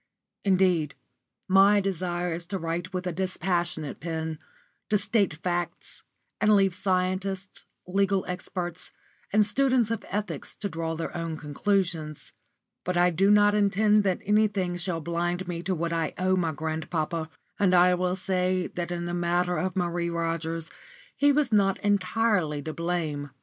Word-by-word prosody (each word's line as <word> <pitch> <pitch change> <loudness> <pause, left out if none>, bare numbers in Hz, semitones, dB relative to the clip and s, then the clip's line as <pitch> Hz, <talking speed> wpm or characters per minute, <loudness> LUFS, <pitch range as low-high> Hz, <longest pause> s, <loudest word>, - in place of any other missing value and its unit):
Indeed, 185 -6 +2 0.5
my 195 +2 +6
desire 180 -2 -2
is 170 +1 -5
to 195 - -2
write 170 +1 -3
with 185 -1 -3
a 180 - -1
dispassionate 175 -3 -2
pen, 160 -1 -4 0.5
to 210 - +4
state 200 -5 +1
facts, 175 +1 -3 0.4
and 215 0 +5
leave 195 -2 +3
scientists, 190 +1 -2 0.2
legal 195 +1 +1
experts, 180 -1 -5 0.4
and 210 +1 +4
students 250 +1 +2
of 230 - -2
ethics 210 +1 -3
to 205 - -3
draw 165 -3 -3
their 165 - -5
own 165 -2 -3
conclusions. 160 0 -2 0.5
But 180 0 -1
I 180 0 +4
do 195 +4 +3
not 205 0 +6
intend 210 +1 +3
that 185 -2 +1
anything 205 -3 +2
shall 175 -2 -2
blind 175 +2 -2
me 170 -1 -3
to 185 +1 -1
what 170 0 -2
I 165 -2 -1
owe 185 +1 +2
my 170 -3 0
grandpapa; 160 +1 -3 0.3
and 185 -2 +4
I 180 +1 +6
will 180 0 0
say 185 -1 0
that 175 0 -3
in 175 0 -3
the 175 - -3
matter 175 +1 +1
of 185 +1 -2
Marie 175 -1 0
Rogers 165 -1 -2 0.4
he 285 0 +4
was 290 -3 +1
not 195 -2 +3
entirely 200 -5 +1
to 155 - -4
blame. 160 -4 -2
180 Hz, 155 wpm, -27 LUFS, 170-195 Hz, 0.5 s, my